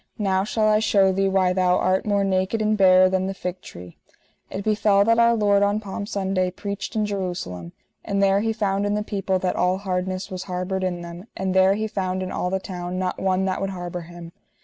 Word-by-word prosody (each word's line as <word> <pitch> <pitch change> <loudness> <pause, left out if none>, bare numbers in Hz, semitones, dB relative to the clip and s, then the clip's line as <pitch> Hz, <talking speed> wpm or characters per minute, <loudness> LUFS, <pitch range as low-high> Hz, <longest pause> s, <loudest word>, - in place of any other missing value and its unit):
Now 190 -3 +1
shall 215 +1 0
I 215 0 +4
shew 195 -3 +3
thee 195 +1 +1
why 190 -1 +2
thou 180 -1 +2
art 185 +3 +1
more 200 -1 +2
naked 190 +3 0
and 215 0 +1
barer 185 -2 +6
than 190 0 0
the 195 - -4
fig 180 0 -5
tree. 90 - -12 0.5
It 195 - -5
befell 205 -1 +3
that 230 +1 +3
Our 235 0 +5
Lord 205 -2 +3
on 205 +1 +2
Palm 205 0 -6
Sunday 190 -2 -1
preached 200 +3 -6
in 215 -1 +1
Jerusalem, 175 - -4 0.3
and 200 - -2
there 195 0 +4
He 225 +2 0
found 205 -2 -1
in 205 - 0
the 210 - -1
people 195 -2 -1
that 185 0 -1
all 180 +1 +1
hardness 185 -1 -3
was 185 0 -5
harboured 185 +1 -3
in 180 -2 -2
them, 175 +4 -9
and 190 -1 -1
there 190 +1 +4
He 220 +1 -2
found 190 -3 -2
in 185 - -5
all 180 - -2
the 190 +1 -1
town 180 -1 -6
not 185 0 -2
one 190 0 +1
that 190 -1 -2
would 195 - -1
harbour 175 -2 -5
him. 170 0 -11
190 Hz, 225 wpm, -23 LUFS, 185-200 Hz, 0.5 s, barer